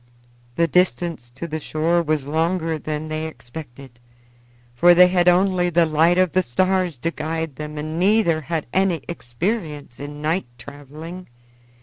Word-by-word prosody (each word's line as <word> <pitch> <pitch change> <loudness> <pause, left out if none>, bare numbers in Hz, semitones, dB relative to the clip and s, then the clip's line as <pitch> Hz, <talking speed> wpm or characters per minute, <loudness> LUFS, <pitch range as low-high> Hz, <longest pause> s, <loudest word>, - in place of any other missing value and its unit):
The 170 +2 +2
distance 170 -6 0
to 135 +8 -7
the 155 0 -4
shore 160 +3 +1
was 155 -4 -1
longer 165 +1 0
than 155 +1 -4
they 155 0 -3
expected, 125 -2 -11 0.7
for 175 +8 +6
they 180 +1 +8
had 180 -1 +2
only 180 0 +3
the 170 0 +3
light 160 +3 +3
of 185 -2 +3
the 185 - +3
stars 185 +2 0
to 165 +7 -2
guide 160 -1 -4
them 150 0 -6
and 155 +2 -4
neither 190 -4 +3
had 155 +2 -3
any 190 -3 +1
experience 150 - -4
in 145 +1 -7
night 155 +2 -1
traveling. 150 +7 -10
160 Hz, 150 wpm, -22 LUFS, 150-175 Hz, 0.7 s, they